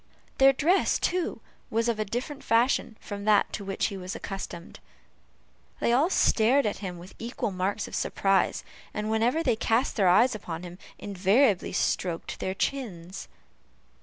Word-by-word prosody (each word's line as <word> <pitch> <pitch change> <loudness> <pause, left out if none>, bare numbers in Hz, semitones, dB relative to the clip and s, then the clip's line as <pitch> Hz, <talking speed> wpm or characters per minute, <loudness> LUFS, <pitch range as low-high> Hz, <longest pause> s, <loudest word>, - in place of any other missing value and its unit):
Their 270 0 +8
dress, 330 +8 +2
too, 360 -1 -1 0.3
was 230 +1 0
of 230 -2 0
a 215 - 0
different 255 +7 -5
fashion 230 -1 +2
from 200 -1 -7
that 210 -2 +3
to 205 - -4
which 195 0 -2
he 200 - -6
was 185 +1 -6
accustomed. 185 -3 -7 1.0
They 235 - +2
all 285 +8 +3
stared 260 - +3
at 210 - -2
him 185 -3 -5
with 175 +2 -12
equal 235 -1 -3
marks 190 +3 -2
of - - -12
surprise, 195 -1 +1 0.3
and 210 +1 -2
whenever 240 +9 +1
they 235 - +2
cast 225 +2 0
eyes 200 +7 +5
upon 175 -5 -6
him, 175 +1 -9 0.2
invariably 200 +3 +2
stroked 170 -3 -2
their 190 - -3
chins. 195 -9 -4
215 Hz, 155 wpm, -27 LUFS, 190-245 Hz, 1.0 s, Their